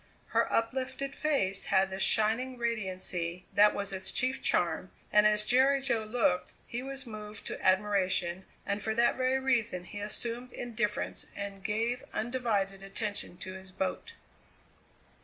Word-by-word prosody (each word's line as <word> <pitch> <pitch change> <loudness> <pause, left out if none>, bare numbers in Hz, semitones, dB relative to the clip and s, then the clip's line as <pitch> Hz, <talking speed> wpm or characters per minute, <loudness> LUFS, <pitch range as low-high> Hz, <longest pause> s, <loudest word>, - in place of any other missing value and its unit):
Her - - +2
uplifted 260 +3 -1
face 200 -11 +1
had 190 -1 +3
the 190 - -4
shining 225 +6 +2
radiancy 185 -6 -2
that 210 +1 +6
was 200 -1 -2
its 190 0 -1
chief 260 0 0
charm, 175 +1 +1 0.2
and 210 0 +7
as 210 0 +4
Jerry 265 +4 +4
Jo 240 -5 0
looked 215 -5 +1
he 240 - -4
was 270 +1 -4
moved 215 -2 -7
to - - -5
admiration, 185 -2 +2 0.2
and 200 +1 -1
for 220 +1 -1
that 235 +1 +4
very 260 +1 +2
reason 230 -8 +1
he 205 +3 -8
assumed 235 +4 -3
indifference 235 -3 -2
and 200 -1 -6
gave 230 +4 0
undivided 215 -5 0
attention 195 -2 -3
to 185 - -6
his 190 0 -9
boat. 190 - -3
210 Hz, 145 wpm, -31 LUFS, 190-245 Hz, 0.2 s, and